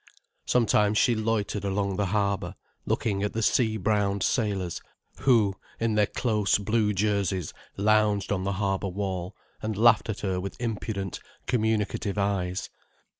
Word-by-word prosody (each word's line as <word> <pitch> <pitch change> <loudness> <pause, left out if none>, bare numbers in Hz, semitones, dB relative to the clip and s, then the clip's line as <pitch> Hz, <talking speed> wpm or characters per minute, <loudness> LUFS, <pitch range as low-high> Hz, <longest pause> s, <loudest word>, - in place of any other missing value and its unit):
Sometimes 105 -3 +3
she 120 - +4
loitered 110 -2 -1
along 100 0 -1
the 100 -1 +1
harbour, 100 -2 -1 0.3
looking 100 -3 0
at 105 - -1
the 115 - -1
sea 110 -1 +2
browned 100 -1 +1
sailors, 100 -7 -1 0.4
who, 115 -7 +4 0.3
in 115 -1 +1
their 105 -1 +3
close 105 -5 +1
blue 105 +1 +1
jerseys, 100 -4 0 0.2
lounged 105 -1 +2
on 95 -2 0
the 100 +1 -1
harbour 95 0 -1
wall, 95 -2 -3 0.3
and 110 -2 -3
laughed 115 0 +5
at 110 - -3
her 95 -2 -1
with 95 +2 -6
impudent, 105 -5 -3 0.3
communicative 110 -3 0
eyes. 95 -2 -1
105 Hz, 140 wpm, -27 LUFS, 95-110 Hz, 0.4 s, laughed